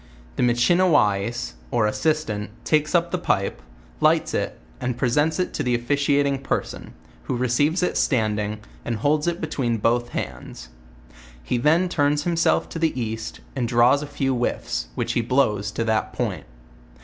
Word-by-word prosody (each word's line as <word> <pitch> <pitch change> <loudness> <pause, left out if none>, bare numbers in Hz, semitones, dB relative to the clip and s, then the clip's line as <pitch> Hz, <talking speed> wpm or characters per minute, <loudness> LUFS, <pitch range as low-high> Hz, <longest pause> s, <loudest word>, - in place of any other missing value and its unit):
The - - -2
Michiniwais, 120 - +2 0.2
or 120 -3 +2
Assistant, 105 -4 -1 0.2
takes 155 +2 +2
up 170 0 +2
tne 180 - -1
pipe, 100 - 0 0.4
lights - - +3
it, - - -2 0.2
and 125 -1 -2
presents 145 +6 +1
it 185 - -1
to - - -2
the 125 -1 +1
officiating 140 +2 +1
person, 135 - -4 0.3
who 125 - -2
receives 145 +8 +1
it 180 - 0
standing, 105 -4 0 0.2
and 120 - -2
holds 150 +8 +1
it 170 0 0
between 130 -7 -1
both 120 +3 +1
his - - -18
hands. - - -11 0.7
He 120 - -1
then 160 +8 +3
turns 145 -3 +1
himself 170 0 +2
to 165 - -5
the 160 -5 0
east, 115 -1 -4
and 125 -3 -1
draws 120 +4 +4
a 150 - -5
few 135 -2 -1
whiffs, 120 - -2
which - - -1
he - - +1
blows 110 -5 +1
to 115 - -1
that 110 -1 0
point.. - - -3
125 Hz, 160 wpm, -23 LUFS, 115-150 Hz, 0.7 s, draws